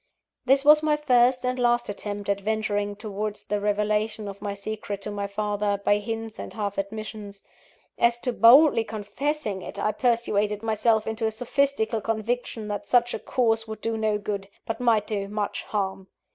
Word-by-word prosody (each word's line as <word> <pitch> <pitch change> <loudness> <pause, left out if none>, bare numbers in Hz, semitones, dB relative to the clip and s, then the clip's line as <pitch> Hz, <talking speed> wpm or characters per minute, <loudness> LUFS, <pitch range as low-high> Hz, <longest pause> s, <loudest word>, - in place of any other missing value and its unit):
This 270 +2 +4
was 300 +1 +8
my 305 -1 +2
first 250 -3 +3
and 250 0 -1
last 240 0 +2
attempt 205 0 -4
at 200 0 0
venturing 205 -1 -1
towards 210 0 -4
the 210 - -2
revelation 210 +1 0
of 200 0 -8
my 205 -1 -3
secret 200 -1 -5
to 210 - -4
my 200 -1 -3
father, 205 0 -1
by 205 - +4
hints 225 0 -5
and - - -6
half 205 -2 -3
admissions. 205 0 -6 0.6
As 235 0 +3
to 250 - -1
boldly 240 +2 +7
confessing 215 +1 -3
it, 200 - -8
I 205 +1 +1
persuaded 215 -3 0
myself 220 0 +2
into 220 0 -1
a - - +1
sophistical 240 -1 0
conviction 225 0 -2
that 205 - -4
such 245 -1 +3
a - - -3
course 225 -3 +1
could 220 -1 -8
do 225 0 -1
no 215 -1 +1
good, 200 -1 -4 0.2
but 225 +1 -4
might 230 -4 +3
do 200 -2 -3
much 205 0 -3
harm. 195 -2 -3
215 Hz, 175 wpm, -25 LUFS, 205-235 Hz, 0.6 s, was